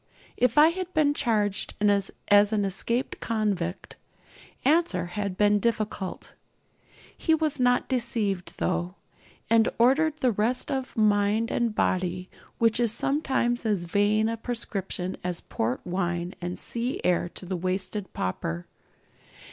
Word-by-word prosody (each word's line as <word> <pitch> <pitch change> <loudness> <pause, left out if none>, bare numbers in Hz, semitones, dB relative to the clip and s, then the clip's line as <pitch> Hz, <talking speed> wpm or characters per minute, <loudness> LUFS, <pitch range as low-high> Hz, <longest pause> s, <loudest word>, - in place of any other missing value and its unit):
If 250 +2 +1
I 305 +2 +8
had 365 +1 -4
been 295 -2 +3
charged 210 -7 0
as 200 -1 +2 0.4
an 210 -2 +1
escaped 235 +6 0
convict, 200 -6 -2 0.7
answer 290 - +3
had 195 +1 -4
been 205 0 +4
difficult. 210 -3 -3 0.8
He 320 - +2
was 310 -3 0
not 245 0 +2
deceived, 225 -7 -1
though, 175 +1 -1 0.5
and 230 0 +4
ordered 290 +6 +3
the 255 -4 +2
rest 225 +6 0
of 265 -2 -3
mind 210 +1 +2
and 235 -3 0
body 185 -1 -1 0.3
which 230 0 +3
is 235 -3 +3
sometimes 265 -2 0
as 210 -6 0
vain 205 +4 +2
a 230 0 -2
prescription 195 -6 -4
as 180 -1 -2
port 120 +3 -3
wine 175 -1 -2
and 175 +1 -4
sea 240 +2 -3
air 175 -1 +1
to - - -5
the 185 +1 -3
wasted 185 +3 -3
pauper. 85 -2 -3
210 Hz, 130 wpm, -26 LUFS, 185-240 Hz, 0.8 s, I